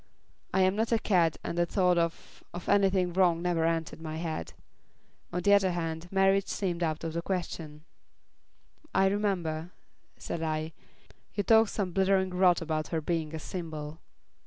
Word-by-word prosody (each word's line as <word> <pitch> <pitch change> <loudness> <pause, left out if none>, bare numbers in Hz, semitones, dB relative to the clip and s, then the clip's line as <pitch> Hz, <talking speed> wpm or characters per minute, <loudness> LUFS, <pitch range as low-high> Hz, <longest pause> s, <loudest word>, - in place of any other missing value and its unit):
I 190 - +2
am 185 +1 +3
not 225 +2 0
a 230 - +4
cad 175 -7 +2
and 170 - -3
the 175 - +2
thought 180 -1 +2
of 170 -1 -4
of 175 - -7
anything 195 -3 +3
wrong 175 -2 +3
never 170 -2 0
entered 165 -1 -1
my 155 -1 -5
head. 160 - -4 0.8
On 180 0 -2
the 200 - +5
other 195 -3 +4
hand, 165 0 -4
marriage 195 0 +3
seemed 180 -3 -2
out 160 -2 -1
of 165 -1 -3
the 170 - -2
question." 165 -4 -4 1.1
"I 190 - +5
remember," 180 -5 -1 0.5
said 165 - -5
I, 155 0 -2 0.6
"you 205 - 0
talked 225 +1 +5
some 195 -4 -2
blithering 190 0 +2
rot 180 -2 +3
about 155 -1 -2
her 165 - -1
being 160 -1 -2
a - - -4
symbol." 155 -3 -6
175 Hz, 165 wpm, -29 LUFS, 160-190 Hz, 1.1 s, the